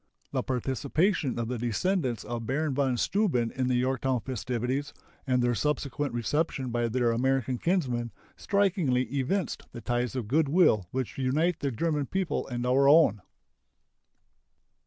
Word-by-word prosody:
The - - 0
participation 135 - 0
of 115 -1 -2
the 125 0 -3
descendants 120 - -1
of 115 0 -5
Baron 150 +2 0
von 130 -2 +1
Steuben 140 - +1
in 130 -1 -1
the 125 - +1
Yorktown 130 0 0
festivities, 130 +3 -3 0.3
and 125 -1 +2
their 120 0 +2
subsequent 145 +1 -1
reception 135 +1 -1
by 120 0 0
their 120 0 +1
American 130 0 0
kinsmen, 130 -10 0 0.3
strikingly 180 -11 +1
evinced 140 +7 -2
the - - -7
ties 120 +1 -1
of 125 -5 -3
good 145 +4 +2
will 145 - +4
which 130 0 -4
unite 150 +7 +1
the 140 - -1
German 145 +3 -1
people 190 -3 -2
and 120 -1 -3
our 135 +2 +4
own. 145 - +5
130 Hz, 145 wpm, -28 LUFS, 120-150 Hz, 0.3 s, own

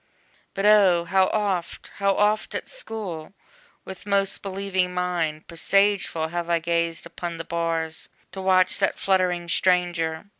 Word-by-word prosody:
But 195 - -1
O! 195 -5 +5
how 190 +2 +3
oft, 195 -5 -2
How 195 -1 +1
oft, 210 +1 +1
at - - -4
school, 205 - -4 0.5
with 190 +2 -10
most 195 -1 +1
believing 190 -2 -2
mind, 170 -4 -2
Presageful, 185 -2 +1
have 175 0 -3
I 170 - +3
gazed 170 0 -1
upon 170 0 -6
the 165 - -6
bars, 165 -1 -2 0.2
To 190 - -7
watch 185 -1 +3
that - - +1
fluttering 180 -2 +1
stranger! 175 -2 +1
180 Hz, 140 wpm, -24 LUFS, 170-195 Hz, 0.5 s, O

